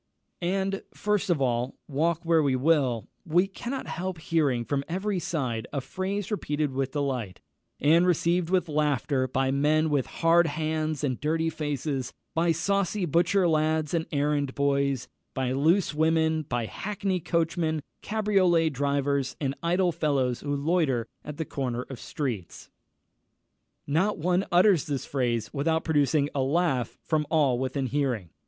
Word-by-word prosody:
And, 195 +2 -1
first 210 -2 0
of 170 -4 +2
all, 120 0 0
walk 160 +3 0
where 165 -1 +4
we 140 -3 +2
will, 130 -6 +2 0.2
we 175 +1 +3
cannot 240 +7 -5
help 185 +1 -4
hearing 150 -7 0
from 140 +4 -1
every 190 +2 -1
side 130 -10 -2
a 140 - -1
phrase 190 - -4
repeated 150 -7 -1
with 135 0 -2
delight, 130 -9 -2 0.4
and 165 +5 +4
received 170 0 +2
with 185 -1 +2
laughter, 145 -3 +1
by 130 +1 0
men 155 +3 +2
with 140 -3 +1
hard 170 0 +3
hands 155 -1 -2
and 130 -4 -1
dirty 160 +2 0
faces, 145 -4 -3 0.2
by 165 +1 +2
saucy 195 +3 0
butcher 175 +4 +3
lads 155 -1 +1
and 165 -1 0
errand 145 -2 0
boys, 140 -2 +1 0.3
by 130 -1 0
loose 160 +7 +2
women, 160 0 +2
by 120 -2 -1
hackney 195 - -2
coachmen, 160 -2 0 0.2
cabriolet 195 -6 +2
drivers, 140 -1 0
and 135 -2 -1
idle 175 +2 +2
fellows 135 -6 0
who 145 0 -2
loiter 140 -5 +1 0.2
at 150 -1 -7
the 160 - -2
corners 125 -4 -3
of 130 - -7
streets. 115 - -5 1.1
Not 175 +9 +1
one 180 +4 +1
utters 180 -2 +4
this 140 -3 -2
phrase 120 -5 -1
without 160 +3 0
producing 145 -2 +2
a 140 - 0
laugh 135 -2 0
from 155 -2 0
all 145 -6 +3
within 130 +1 -1
hearing. 125 - -1
155 Hz, 145 wpm, -27 LUFS, 135-170 Hz, 1.1 s, where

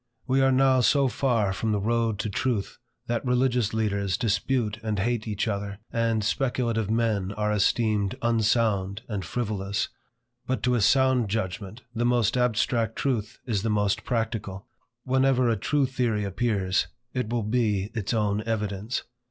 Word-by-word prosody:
We 135 +1 +2
are 135 0 +4
now 130 0 +4
so 135 +4 +4
far 115 -5 +1
from 110 +3 -1
the 105 - +1
road 115 +1 0
to 110 - -3
truth, 115 -1 -2 0.3
that 120 0 -1
religious 125 -3 +2
teachers 100 -4 0
dispute 115 0 0
and 110 -2 -2
hate 115 +2 -1
each 105 +1 -1
other, 100 -1 -3 0.2
and 115 -2 +1
speculative 115 -2 0
men 110 -4 0
are 105 0 -1
esteemed 105 -1 +1
unsound 110 -3 +1
and 105 -4 -3
frivolous. 100 0 -2 0.6
But 130 - -1
to 125 - +2
a 120 - +2
sound 130 -1 +3
judgment, 100 +2 -4
the 115 0 -1
most 120 -3 +2
abstract 115 -1 +1
truth 120 -5 -2
is 110 -6 0
the 115 - -1
most 105 -2 +1
practical. 110 -5 -3 0.4
Whenever 130 -1 +3
a 115 - +2
true 140 +7 +1
theory 120 -5 0
appears, 100 -2 0 0.3
it 125 -4 -2
will 120 -1 -1
be 105 -3 0
its 110 -5 -2
own 105 -2 +1
evidence. 105 +1 -2
110 Hz, 155 wpm, -26 LUFS, 105-125 Hz, 0.6 s, are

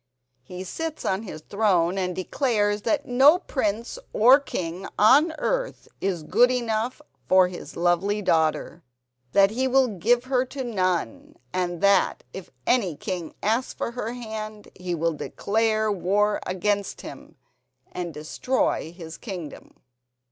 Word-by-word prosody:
He 180 +8 -8
sits 320 - -5
on 190 +2 0
his 155 -8 -8
throne 190 -3 +1
and 180 -1 -2
declares 205 0 0
that 295 +5 0
no 270 +7 +6
prince 235 - -3
or 250 +6 +7
king 180 - -5
on 285 +10 +6
earth - - -2
is 185 -5 -1
good 245 +10 +4
enough 240 +2 -2 0.2
for 185 -1 +5
his 180 - -9
lovely 175 +4 +1
daughter, 160 0 +1 0.5
that 200 0 +5
he 260 +4 0
will 260 -1 +3
give 225 +5 +1
her 255 -1 +1
to 265 +1 -6
none, 185 - -2 0.2
and 175 -2 -2
that 200 -1 +3
if 190 - -8 0.2
any 200 -11 +2
king 175 0 -5
asks 225 +5 0
for - - -3
her 235 -1 -4
hand 215 -3 -7
he 180 -1 -4
will 165 0 0
declare 215 +6 0
war 205 +2 +1
against 200 +2 -1
him - - -11 0.6
and 175 -1 -4
destroy 155 - -1
his 165 -2 -10
kingdom." 180 - -8
205 Hz, 140 wpm, -25 LUFS, 180-245 Hz, 0.6 s, or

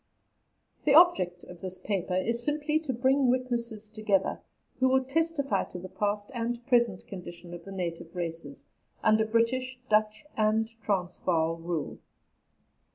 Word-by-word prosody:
The 285 -1 +5
object 185 - +5
of 175 -1 -12
this 185 -1 -6
paper 185 -1 -2
is 230 +6 0
simply 300 +2 +1
to 310 -4 -3
bring 260 +2 +3
witnesses 235 -4 -1
together 215 -3 0 0.4
who 260 0 +4
will 265 0 +3
testify 290 0 0
to - - -9
the 185 +1 -8
past 205 +4 -2
and 240 0 -3
present 235 -7 +2
condition 175 -2 -9
of 175 -1 -9
the 195 - -8
native 170 -2 -5
races 165 -4 -5 0.4
under 220 0 +4
British, 250 +3 +1
Dutch, 215 +2 +2
and 220 +1 +2
Transvaal 180 -4 0
rule. 165 -1 -4
215 Hz, 140 wpm, -29 LUFS, 180-255 Hz, 0.4 s, The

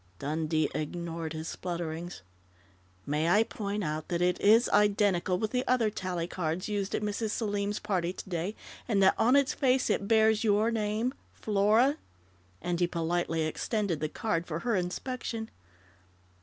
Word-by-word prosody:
Dundee 155 - 0
ignored 165 0 -4
his 160 +1 -5
splutterings. 170 - -5 0.8
"May 150 +3 0
I 210 +5 +5
point 205 -2 -4
out 155 -1 -3
that 170 - -1
it 180 0 +1
is 225 +4 +6
identical 200 -3 +3
with 215 +3 -2
the 250 0 0
other 235 -4 +2
tally 180 -4 -3
cards 170 0 -3
used 205 -2 -2
at - - -2
Mrs. 210 +1 -2
Selim's 205 -2 -1
party 185 -4 -1
today, 185 +2 -4 0.3
and 200 -5 +2
that 190 - +6
on 245 +4 +4
its 280 -1 +3
face 260 -1 +2
it 200 - -1
bears 220 0 +4
your 215 +1 +3
name, 220 +3 -1 0.2
'Flora'?" 215 +7 +3 0.7
and 175 -1 -1
he 175 - +3
politely 165 -1 -1
extended 180 +2 -1
the 155 0 -2
card 170 -4 -2
for 165 0 -4
her 235 -2 0
inspection. 220 +5 -3
195 Hz, 155 wpm, -29 LUFS, 170-220 Hz, 0.8 s, is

